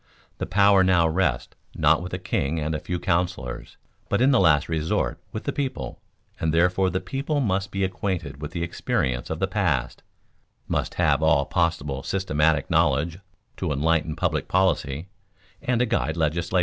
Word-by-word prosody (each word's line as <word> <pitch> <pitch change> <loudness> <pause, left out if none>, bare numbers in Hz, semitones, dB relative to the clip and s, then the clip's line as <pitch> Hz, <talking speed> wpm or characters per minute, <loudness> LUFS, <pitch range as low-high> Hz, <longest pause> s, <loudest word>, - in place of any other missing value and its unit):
The - - -3
power 100 -1 +5
now 90 -3 +4
rests 80 -7 0 0.2
not - - +3
with 90 +1 -6
the 90 - -2
king 80 -4 -1
and 80 +1 -2
a 75 - -2
few 90 +2 -4
counselors, 85 -8 -2 0.3
but 100 - +1
in 130 +3 +4
the 130 - +4
last 75 -6 +4
resort 80 -1 -1
with 110 - -5
the 140 - -2
people, 130 - -4 0.4
and 80 - 0
therefore 90 +3 +3
the 90 +1 -1
people 135 - -2
must 95 -6 0
be 95 0 -2
acquainted 90 -7 -3
with 75 - -4
the 85 0 -4
experience 65 -6 -1
of 80 - -2
the 95 - +1
past, 90 - -1 0.7
must - - -2
have - - +2
all 80 -3 +3
possible 75 -6 -1
systematic 75 -6 +1
knowledge 80 0 +1 0.4
to 90 -4 -2
enlighten 80 +2 +1
public 85 - -1
policy 85 -4 +1 0.5
and 125 -1 0
to - - +4
guide 80 -7 -1
legislation. 85 +3 0
85 Hz, 170 wpm, -24 LUFS, 75-95 Hz, 0.7 s, power